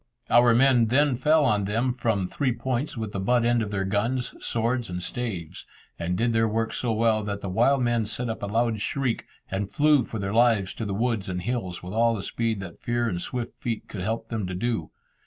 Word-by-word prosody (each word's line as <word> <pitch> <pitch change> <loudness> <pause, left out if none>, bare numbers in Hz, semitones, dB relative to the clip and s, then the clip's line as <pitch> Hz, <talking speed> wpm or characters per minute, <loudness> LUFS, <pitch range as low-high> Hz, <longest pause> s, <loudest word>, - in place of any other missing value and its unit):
Our 120 -1 +6
men 125 -2 +5
then 140 +3 +3
fell 150 +4 +3
on 105 -4 +2
them 115 +5 0
from 110 -6 0
three 130 +7 -1
points 125 +3 -2
with 110 -2 -3
the 100 - -3
butt 120 +4 +2
end 120 0 +3
of 105 - -2
their 95 -1 -1
guns, 115 +6 -1
swords, 120 0 -1
and 90 0 -3
staves, 95 -5 -5 0.3
and 90 +1 -1
did 115 +1 +1
their 115 0 +3
work 115 +1 -1
so 120 - -1
well 110 -1 +2
that 100 -1 -3
the 100 - -4
wild 125 +7 +3
men 120 -3 +1
set 120 +3 -3
up 115 - -4
a 100 - -2
loud 115 0 0
shriek, 130 0 -1 0.3
and 95 +1 -2
flew 150 0 +4
for 110 - -6
their 100 -1 -3
lives 115 -5 +3
to 115 - -5
the 100 -2 -2
woods 110 -3 -1
and 90 -1 -3
hills, 95 -7 -3
with 90 +2 -6
all 115 +1 +3
the 100 - -5
speed 115 -2 -1
that 85 -4 -9
fear 120 0 0
and 90 -6 -2
swift 120 +2 -5
feet 115 -3 -3
could 100 - -6
help 115 +4 -3
them 110 -5 -2
to 90 - -4
do. 105 -4 -2
115 Hz, 230 wpm, -26 LUFS, 100-120 Hz, 0.3 s, Our